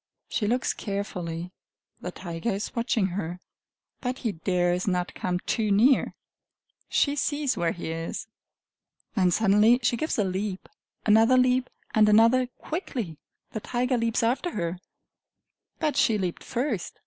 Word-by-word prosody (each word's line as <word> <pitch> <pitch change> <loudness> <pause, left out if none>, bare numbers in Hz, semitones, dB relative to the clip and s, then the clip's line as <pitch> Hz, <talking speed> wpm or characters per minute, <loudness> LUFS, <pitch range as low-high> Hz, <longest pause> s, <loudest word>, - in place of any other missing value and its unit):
She 210 - -1
looks 245 +3 +1
carefully: 180 -4 -4 0.5
the 180 - -4
tiger 170 +3 -4
is 200 0 -3
watching 235 -3 +1
her, 175 -1 -4 0.6
but 255 0 -3
he 230 -5 -1
dares 180 +1 0
not 180 -2 0
come 180 -1 -1
too 220 -3 0
near. 235 +7 +4 0.7
She 285 -1 +2
sees 290 -2 0
where 170 -4 0
he 170 -1 -5
is 165 0 -4 0.9
then 185 -5 +3
suddenly 215 +5 +4
she 230 - +2
gives 310 +6 -1
a 210 - +3
leap 190 +1 -3 0.4
another 225 +4 +5
leap 255 0 +3 0.2
and 215 -1 +5
another 230 +4 +5
quickly! 245 - -5 0.3
The 220 - -3
tiger 250 +4 0
leaps 230 -1 0
after 260 +9 0
her 170 -2 -2 1.0
but 305 -2 0
she 220 -3 +3
leaped 180 -3 -3
first! 240 -6 -3
215 Hz, 140 wpm, -26 LUFS, 180-250 Hz, 1.0 s, another